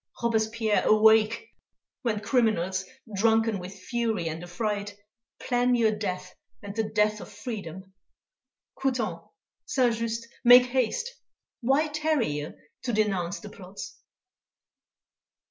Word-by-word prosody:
Robespierre, 220 -1 +1
awake; 220 - +4 0.5
when 225 -5 -1
criminals, 200 -6 +1 0.3
drunken 225 0 +2
with 185 +2 -8
fury 220 -2 -2
and 160 +1 -5
affright, 205 +2 -3 0.4
plan 245 0 +2
your 225 -2 +3
death 185 -3 -4 0.3
and 200 0 -7
the 220 -1 -1
death 210 0 +1
of - - -10
freedom! 195 -4 -7 0.9
Couthon, 230 -11 -1 0.5
Saint 255 - +2
Just, 230 0 -3 0.2
make 245 0 +9
haste; 260 - 0 0.5
why 275 +5 +2
tarry 305 - 0
ye 145 +1 -3 0.3
to 250 - -2
denounce 195 -4 0
the 210 - -9
plots? 190 0 -10
220 Hz, 110 wpm, -27 LUFS, 195-240 Hz, 0.9 s, make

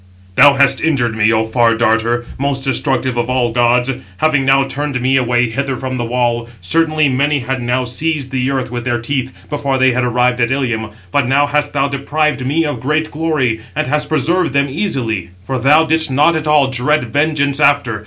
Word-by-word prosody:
"Thou 145 -1 +6
hast 135 -1 +3
injured 130 -8 0
me, 110 0 +2
O 110 0 +1
Far 115 0 +2
darter, 115 +1 +1
most 140 -1 -1
destructive 130 -1 0
of 120 +1 -1
all 125 -2 0
gods, 120 +2 +2 0.3
having 150 0 +1
now 135 +1 +3
turned 135 0 -3
me 130 +2 +1
away 120 -1 +1
hither 135 +3 -3
from 130 0 -4
the 120 - -2
wall; 120 0 -1
certainly 155 - +1
many 140 +2 0
had 130 +1 -3
now 125 +1 -1
seized 140 +2 -2
the 130 0 -1
earth 130 -3 -2
with 120 -1 -4
their 120 -1 -1
teeth, 130 +2 -3 0.2
before 140 -2 -2
they 130 0 +3
had 125 +1 -1
arrived 125 0 +1
at 120 - +2
Ilium. 120 -5 -2 0.2
But 140 -3 +1
now 140 +3 +3
hast 145 0 -1
thou 140 -1 +1
deprived 140 +1 -1
me 150 +5 0
of 145 - -3
great 155 +3 -1
glory, 145 -8 -1
and - - -1
hast 150 +3 -1
preserved 170 0 0
them 140 0 +1
easily, 130 - -2 0.2
for 130 +2 -3
thou 145 +6 +4
didst 160 -1 +1
not 150 +5 +3
at 155 -1 -3
all 150 -2 +4
dread 130 +3 0
vengeance 145 -1 0
after. 140 -7 +2
135 Hz, 200 wpm, -15 LUFS, 120-145 Hz, 0.3 s, Thou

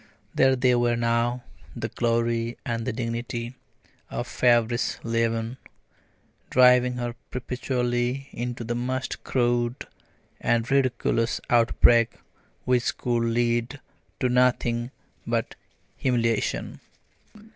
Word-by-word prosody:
There 130 0 +4
they 125 0 +3
were 120 -1 +2
now 120 +1 0 0.3
the - - -4
glory 115 0 0
and 115 -1 -3
the - - +1
dignity 115 +1 -4 0.6
a - - -3
feverish 120 -1 +2
leaven, 115 +1 -1 0.9
driving 125 0 +5
her 120 -1 -3 0.2
perpetually 125 +1 -2
into 120 0 -4
the 115 +1 -2
most 130 +2 -3
crude 120 -1 0 0.5
and 120 +1 0
ridiculous 125 -3 +1
outbreaks, 115 0 +4 0.5
which 125 -1 +1
could 120 -1 0
lead 120 +3 0 0.4
to 130 - +2
nothing 125 -1 +2 0.4
but - - -1 0.4
humiliation. 115 -3 0
120 Hz, 100 wpm, -25 LUFS, 115-125 Hz, 0.9 s, driving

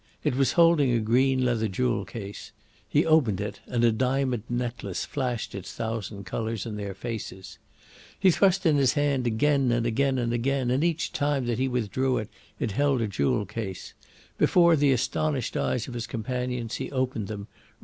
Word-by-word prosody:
It - - +1
was 135 0 +2
holding 165 -5 +5
a 120 - +2
green 130 +4 +2
leather 115 -3 +1
jewel 120 +5 -1
case. 100 -3 -8 0.4
He - - +3
opened 145 - +3
it, 105 0 -4
and 120 -1 0
a 120 - +5
diamond 130 0 0
necklace 120 -6 -3
flashed 125 -5 -3
its 100 -3 -7
thousand 110 -3 -4
colours 110 +1 -3
in 110 -2 -5
their 100 -2 -5
faces. 105 -4 -7 0.6
He 190 -1 +5
thrust 195 +1 +3
in 155 -3 +4
his 135 -3 +3
hand 140 -4 +1
again 135 +2 +2
and 120 0 +1
again 130 +3 +1
and 120 -1 0
again, 130 +1 0
and 135 +4 +1
each 170 -2 0
time 145 -3 0
that 120 0 -1
he 130 - +1
withdrew 125 +1 0
it, 110 - -4 0.3
it - - -1
held 140 +4 +2
a 115 - 0
jewel 100 +2 0
case. 100 -2 -6 0.5
Before 170 -2 +5
the 145 -2 +3
astonished 135 +1 0
eyes 120 - -1
of 125 - -7
his 120 -1 -4
companions 125 0 -3
he - - -4
opened 130 -6 -1
them. 105 -2 -6
125 Hz, 180 wpm, -26 LUFS, 110-135 Hz, 0.6 s, holding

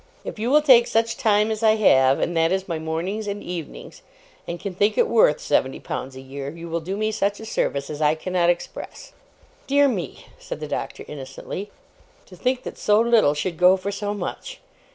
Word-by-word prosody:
'If - - -6
you 230 +3 -1
will 300 +2 +5
take 245 -5 +6
such 225 0 +1
time 210 -1 +2
as 215 0 -3
I 220 -1 +5
have, 135 -11 +4
and 175 - -1
that 165 +1 +2
is 190 0 -1
my 165 -3 -3
mornings 170 +7 -3
and 205 0 -4
evenings, 175 -4 -7 0.5
and 170 0 -5
can 200 0 -5
think 205 +3 +1
it - - +4
worth 220 -10 +4
seventy 130 - 0
pounds 130 0 -6
a 130 - -9
year, 135 +1 -7
you 165 +2 -9
will 165 +1 -1
do 185 +5 -5
me 215 +1 0
such 205 -1 -1
a 220 - -8
service 140 -9 -1
as 150 0 -6
I 150 0 +3
cannot 175 +1 0
express.' 175 0 -4 0.5
'Dear 285 +1 +4
me!' 185 - -4
said - - -7
the - - -5
Doctor, - - -5
innocently. 145 +8 -7 0.6
'To 185 - -14
think 250 +7 -1
that - - -8
so 210 0 +3
little 230 -10 +4
should 165 +3 -3
go 180 +2 +6
for 195 +2 -4
so 205 0 -3
much! - - -6
190 Hz, 210 wpm, -23 LUFS, 160-215 Hz, 0.6 s, take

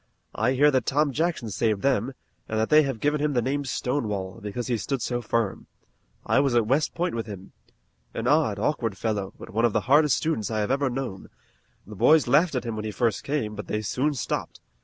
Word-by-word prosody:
I 115 +5 +1
hear 145 +3 +5
that 130 -2 0
Tom 145 +1 +2
Jackson 155 -6 -1
saved 105 0 0
them, 135 -1 +1 0.4
and 110 - -1
that 110 - 0
they 155 0 +8
have 135 -6 -2
given 145 +3 +1
him 150 -1 +1
the 125 - +2
name 140 +3 -1
Stonewall, 110 -8 -2
because 105 +4 -4
he 125 - 0
stood 135 +4 -2
so 120 +1 -2
firm. 115 -3 -2 0.6
I - - +3
was 135 -3 +2
at 115 -2 +3
West 135 +7 +1
Point 175 +1 -1
with 115 -1 -3
him. 100 -2 -9 0.6
An 115 - -3
odd, 145 -6 +2
awkward 115 -3 -1
fellow, 105 -4 -2
but - - -10
one 115 +3 0
of 120 -3 +3
the 110 - +2
hardest 145 +2 +4
students 155 -10 -1
I 110 -1 -1
have 105 - -1
ever 140 0 +1
known. 120 -6 -5 0.6
The 105 - -10
boys 150 +9 +4
laughed 150 +5 +3
at 125 - -1
him 115 -2 -4
when 110 0 -4
he - - -2
first 115 -1 0
came, 135 -7 -2
but 105 0 -7
they 105 0 -2
soon 140 +8 0
stopped. 125 - -3
120 Hz, 220 wpm, -25 LUFS, 110-145 Hz, 0.6 s, they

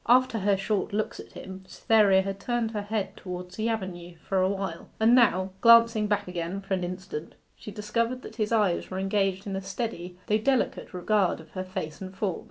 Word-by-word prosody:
After 250 -1 +4
her 200 0 +2
short 200 +1 -1
looks 215 +1 -2
at - - -11
him, 190 0 -9
Cytherea 200 -4 +4
had 195 0 -4
turned 235 +1 -1
her 210 -2 -2
head 205 0 -3
towards 180 0 -7
the 220 +2 -1
avenue 180 -5 -4
for 190 -1 +2
a 185 - +3
while, 195 -4 -4
and 225 +2 +5
now, 195 -6 +4
glancing 230 -2 +6
back 205 -2 0
again 180 +1 -3
for 195 0 -4
an 185 -1 0
instant, 180 -3 -6 0.2
she - - -10
discovered 230 +5 -2
that - - -10
his 215 -1 -1
eyes 210 -6 +2
were 185 - -4
engaged 195 0 0
in 195 -2 -3
a 195 - -3
steady, 180 -5 -5
though 215 +1 +2
delicate, 260 +3 0
regard 190 +1 +1
of - - -14
her 185 - -4
face 170 -4 -6
and 190 0 -7
form. 195 -3 -1
195 Hz, 205 wpm, -27 LUFS, 185-220 Hz, 0.2 s, glancing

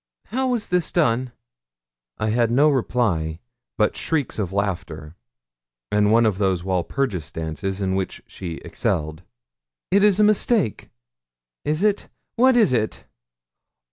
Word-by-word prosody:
'How 260 +5 0
was 245 -4 -1
this 180 -2 +1
done?' 130 -6 +1 0.9
I 110 - -1
had 115 +1 +2
no 140 +6 +4
reply 105 - 0 0.4
but 105 - +2
shrieks 145 -8 -2
of 95 -4 -2
laughter, 85 -6 -3 0.8
and 105 0 +3
one 115 +1 +5
of 105 -3 +1
those 95 -3 +1
Walpurgis 95 - -2
dances 80 +5 -4
in 95 -1 0
which 95 0 -3
she 85 -3 -7
excelled. 80 +1 -2 0.7
'It 200 +2 +4
is 210 -1 +4
a - - +6
mistake 210 - +2 0.7
is 155 +5 0
it? 210 -1 +1 0.3
What 255 +1 +4
is 215 - +4
it?' 110 -3 -1
110 Hz, 135 wpm, -22 LUFS, -, 0.9 s, a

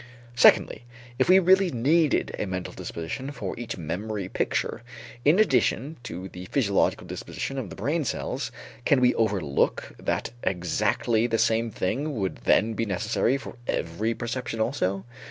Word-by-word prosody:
Secondly, 120 -1 +5 0.4
if - - +3
we 185 - +8
really 190 0 +5
needed 150 +4 +2
a - - -1
mental 90 -2 -4
disposition 85 - -5
for 110 -9 -5
each 120 - -5
memory 95 +5 -4
picture, 95 - -1 0.4
in 150 +5 +5
addition 140 - +2
to 95 -6 -6
the 90 -1 -9
physiological 100 -2 +1
disposition 135 0 -5
of 115 -8 -5
the - - -8
brain 150 +10 0
cells, - - -3 0.3
can 140 - +4
we 125 0 +4
overlook 100 -11 0
that - - -2
exactly 105 +6 +1
the 115 -1 +1
same 115 +1 +2
thing 135 +9 -2
would 95 -4 -2
then 110 +2 +3
be 115 - -1
necessary 110 +6 +1
for 140 - -9
every 105 +8 -1
perception 120 -1 -4
also? 100 -5 0
115 Hz, 150 wpm, -26 LUFS, 95-135 Hz, 0.4 s, we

